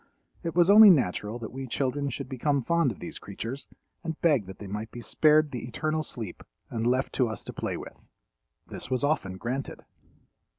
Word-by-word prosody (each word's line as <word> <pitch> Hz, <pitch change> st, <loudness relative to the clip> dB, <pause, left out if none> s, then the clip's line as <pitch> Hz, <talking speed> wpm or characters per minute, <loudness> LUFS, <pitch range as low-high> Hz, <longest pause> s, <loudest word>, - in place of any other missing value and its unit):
It 165 Hz, -2 st, -4 dB
was 175 Hz, -1 st, +5 dB
only 215 Hz, 0 st, +10 dB
natural 110 Hz, -, +2 dB
that 115 Hz, -2 st, -7 dB
we 135 Hz, +1 st, -6 dB
children 140 Hz, +3 st, -1 dB
should 135 Hz, +1 st, -5 dB
become 135 Hz, +1 st, 0 dB
fond 170 Hz, -2 st, +2 dB
of 100 Hz, -, -9 dB
these -, -, -6 dB
creatures 130 Hz, +4 st, -6 dB, 0.4 s
and 160 Hz, -1 st, -4 dB
beg 145 Hz, -, +3 dB
that 95 Hz, -, -9 dB
they 105 Hz, -, -9 dB
might 105 Hz, +3 st, -5 dB
be 120 Hz, -, -9 dB
spared 150 Hz, +5 st, +3 dB
the 125 Hz, -, -5 dB
eternal 155 Hz, +6 st, -1 dB
sleep 115 Hz, -, -6 dB, 0.3 s
and 115 Hz, -1 st, -1 dB
left 130 Hz, +2 st, +1 dB
to 125 Hz, -, +2 dB
us 110 Hz, -2 st, -5 dB
to -, -, -8 dB
play -, -, -3 dB
with. -, -, -11 dB, 0.6 s
This -, -, -6 dB
was 130 Hz, +1 st, 0 dB
often 100 Hz, -11 st, 0 dB
granted. 130 Hz, +6 st, -4 dB
130 Hz, 195 wpm, -28 LUFS, 115-150 Hz, 0.6 s, only